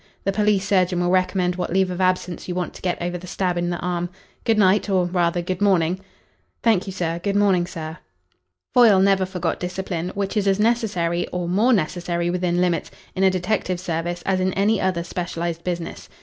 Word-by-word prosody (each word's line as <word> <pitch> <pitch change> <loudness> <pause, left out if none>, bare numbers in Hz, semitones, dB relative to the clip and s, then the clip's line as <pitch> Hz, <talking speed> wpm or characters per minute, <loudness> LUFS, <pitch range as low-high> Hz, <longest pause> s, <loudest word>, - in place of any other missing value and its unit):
The 195 - +1
police 205 -1 +1
surgeon 185 -3 +2
will 175 0 +1
recommend 185 -1 +1
what 180 - -3
leave 190 0 +2
of 180 +1 -3
absence 185 -2 0
you 180 - -3
want 180 -1 -2
to - - -12
get 180 -1 -1
over 175 +1 -3
the 180 - -10
stab 180 0 -1
in 175 0 -1
the 175 - -2
arm. 175 0 -2 0.4
Good 225 -2 +3
night 200 +1 +3
or 185 -2 +2
rather, 175 -1 0
good 185 +2 -3
morning." 185 -3 +2 0.6
"Thank 215 -4 +3
you, - - -3
sir. 170 -2 -2
Good 200 +1 -1
morning, 195 -4 +3
sir." 160 -3 -7 0.7
Foyle 225 -6 +6
never 190 -1 +3
forgot 180 -2 -2
discipline, 180 -1 -3
which 200 +1 -2
is 205 -2 +1
as 195 0 +2
necessary, 210 -7 +1
or 180 -1 -3
more 210 +8 +3
necessary 175 -3 0
within 180 -1 0
limits, 180 -1 0 0.3
in 190 - 0
a 190 - +6
detective 185 0 -1
service 175 -1 -3
as 190 -1 +1
in 185 0 0
any 205 +2 +2
other 180 -3 0
specialised 170 -1 -4
business. 175 -2 -5
180 Hz, 200 wpm, -22 LUFS, 175-195 Hz, 0.7 s, Foyle